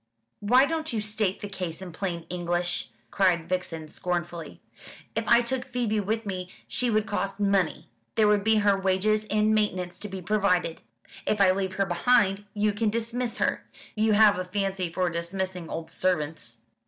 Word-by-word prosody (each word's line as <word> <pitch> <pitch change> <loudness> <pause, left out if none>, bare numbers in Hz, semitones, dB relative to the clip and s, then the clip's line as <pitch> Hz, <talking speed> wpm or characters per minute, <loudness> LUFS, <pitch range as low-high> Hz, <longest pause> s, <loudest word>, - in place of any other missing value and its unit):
"Why 250 +6 +5
don't 315 +1 -2
you 225 - -1
state 210 -2 -1
the 205 - -4
case 180 -5 -5
in 190 -2 -8
plain 170 -1 -4
English?" 175 0 -2 0.2
cried 180 -4 +2
Vixen 175 -3 -3
scornfully. 175 -2 -4 0.6
"If - - -1
I 235 0 +6
took 255 +1 -2
Phoebe 240 -4 -1
with 220 +3 -1
me 185 -2 -4 0.2
she 250 - -1
would 215 -1 +2
cost 200 -1 -2
money. 195 -4 +1 0.3
There 215 -1 +4
would 210 -1 +3
be 220 +1 +4
her 200 -1 +5
wages 195 +3 +1
and 215 +1 +3
maintenance 185 -4 0
to 210 - -5
be 195 -1 -5
provided. 180 -4 +1 0.5
If 215 - +1
I 190 -2 +6
leave 190 0 -1
her 195 +1 +1
behind, 195 +2 +3
you 210 0 +2
can 210 +1 +1
dismiss 230 +2 -2
her. - - 0 0.3
You 215 0 +2
have 210 -2 +6
a - - -1
fancy 190 -2 -2
for 180 +1 0
dismissing 180 0 -3
old 160 0 -5
servants." 155 -10 -2
195 Hz, 175 wpm, -27 LUFS, 180-215 Hz, 0.6 s, I